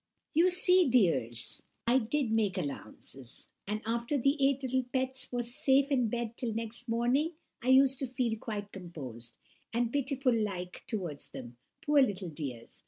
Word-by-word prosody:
"So - - -55
you 355 +2 +6
see, 360 -2 +4
dears, 140 - +1 0.2
I 245 +3 +4
did 250 +1 -1
make 210 -4 +1
allowances; 135 -5 -7 0.2
and 215 +2 -2
after 235 +5 0
the 275 +2 +3
eight 275 0 +3
little 260 0 +1
pets 260 0 -2
was 240 -1 -2
safe 275 +2 +3
in 250 -4 +3
bed 235 0 -3
till 230 -3 -3
next 230 +2 -5
morning, 250 +8 +2 0.3
I 240 - -6
used 265 0 +6
to 270 - -2
feel 240 -2 0
quite 205 -2 -5
composed, 130 - -8 0.3
and 235 0 0
pitiful 275 -2 +1
like 195 -5 -2
towards 175 -10 -4
them, 120 -1 -9 0.3
poor 295 -2 +5
little 200 -7 0
dears! 135 -7 -7
235 Hz, 165 wpm, -31 LUFS, 185-265 Hz, 0.3 s, you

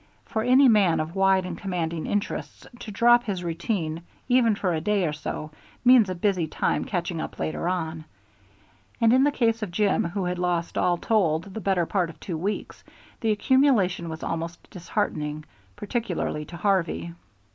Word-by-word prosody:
For 220 - -2
any 255 +4 +5
man 200 -8 +4
of 155 +1 -3
wide 190 -1 +3
and 180 -2 -5
commanding 170 -4 -3
interests 205 -1 -3
to - - -8
drop 240 +3 +4
his 190 -5 -3
routine 170 -1 -2 0.3
even 245 -4 +4
for 185 -3 -1
a 160 - -1
day 205 +1 +1
or 150 - -1
so 155 0 -5 0.3
means 245 -5 +7
a 185 - -2
busy 180 -2 0
time - - -1
catching 175 -3 -3
up - - -7
later 160 +2 -2
on; 160 -3 -3 0.9
and 230 -1 +4
in 260 +1 +5
the 290 - +3
case 230 -4 +1
of 210 - -3
Jim, 200 +3 +1
who 185 +2 -2
had 180 0 -2
lost 175 -1 -1
all 175 -1 +2
told 170 -6 +1
the 220 - -5
better 190 -4 +1
part 180 -1 0
of 165 - -13
two 175 - -5
weeks, 195 +6 -4 0.4
the 225 - -1
accumulation 210 - +2
was 160 0 -7
almost 165 +1 -4
disheartening, 150 -3 -3 0.3
particularly 205 -8 -3
to 170 - -9
Harvey. 175 -2 0
185 Hz, 175 wpm, -25 LUFS, 165-215 Hz, 0.9 s, means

